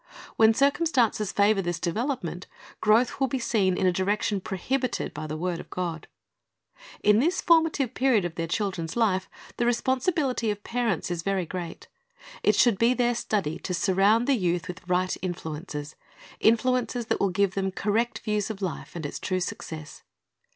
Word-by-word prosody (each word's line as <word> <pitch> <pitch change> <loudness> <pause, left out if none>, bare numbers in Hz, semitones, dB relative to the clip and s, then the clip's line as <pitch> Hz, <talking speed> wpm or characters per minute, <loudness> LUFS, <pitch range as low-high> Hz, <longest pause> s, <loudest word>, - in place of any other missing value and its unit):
Wlien 220 0 +6
circum 285 +5 +3
stances 230 - +1
favor 200 0 +3
this 175 -2 -2
development, 185 - -3 0.3
growth 225 +5 +3
will 270 - +2
be 265 - -2
seen 200 -7 +1
in - - +1
a 185 - +5
direction 200 +2 0
prohibited 250 +8 -2
by 155 +1 -5
the 155 +1 -4
word 175 +1 -2
of - - -10
God. 170 -3 -4 1.0
In 210 +1 +5
this 340 +8 +2
formative 320 -7 +3
period 250 -8 +2
of 175 - -3
their 165 0 -3
children's 175 -3 -2
life, 195 -5 +1 0.3
the 240 - +1
responsibility 260 0 +1
of 205 0 -3
parents 230 -7 -1
is 170 -1 -2
very 195 0 -1
great. 175 0 -6 0.5
It - - +3
should 235 -6 +4
be 235 +2 +4
their 245 -1 +2
study 195 -9 -2
to 180 - -3
surround 195 +6 +3
the 280 - +4
youth 180 -6 0
with 180 - -7
right 185 0 +1
influences, 160 -4 -5 0.4
influences 245 +1 +2
that - - -1
will 200 - +2
give 195 +1 +1
them 195 -1 -1
correct 215 +5 0
views 210 -2 -2
of 215 -3 -5
life 185 -3 -5
and 165 -3 -5
its 145 - -5
true 185 0 -1
success. 155 -4 -6
200 Hz, 170 wpm, -26 LUFS, 180-240 Hz, 1.0 s, Wlien